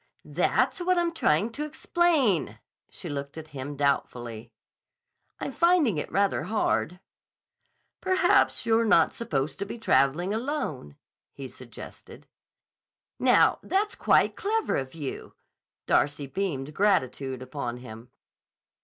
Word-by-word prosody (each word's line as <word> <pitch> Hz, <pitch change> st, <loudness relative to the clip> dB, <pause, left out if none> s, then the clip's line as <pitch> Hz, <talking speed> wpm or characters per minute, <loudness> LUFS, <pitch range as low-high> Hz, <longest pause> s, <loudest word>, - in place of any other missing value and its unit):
"That's -, -, +1 dB
what 360 Hz, +1 st, +1 dB
I'm 345 Hz, -1 st, +1 dB
trying 215 Hz, -, +1 dB
to 290 Hz, +6 st, -4 dB
explain." 300 Hz, -, +1 dB, 0.3 s
She -, -, -8 dB
looked 140 Hz, +1 st, -5 dB
at 160 Hz, -1 st, -8 dB
him 145 Hz, 0 st, -6 dB
doubtfully. 120 Hz, -5 st, -2 dB, 0.9 s
"I'm -, -, -4 dB
finding 335 Hz, -, +3 dB
it -, -, -5 dB
rather 200 Hz, 0 st, +1 dB
hard." 180 Hz, -, 0 dB, 1.0 s
"Perhaps 370 Hz, -1 st, +2 dB
you're 225 Hz, 0 st, +3 dB
not 170 Hz, -7 st, +4 dB
supposed 150 Hz, -10 st, -2 dB
to 200 Hz, -, -2 dB
be 235 Hz, -, -6 dB
traveling 175 Hz, -2 st, +2 dB
alone," 220 Hz, -, -3 dB, 0.4 s
he 135 Hz, -1 st, -7 dB
suggested. 125 Hz, -2 st, -12 dB, 0.9 s
"Now, -, -, +4 dB
that's 415 Hz, +2 st, 0 dB
quite -, -, +3 dB
clever 440 Hz, +1 st, 0 dB
of 135 Hz, +2 st, -4 dB
you!" 145 Hz, -5 st, -6 dB, 0.5 s
Darcy 145 Hz, 0 st, +1 dB
beamed 150 Hz, -3 st, -3 dB
gratitude 135 Hz, -9 st, 0 dB
upon 125 Hz, -2 st, -5 dB
him. 120 Hz, -1 st, -11 dB
160 Hz, 120 wpm, -27 LUFS, -, 1.0 s, not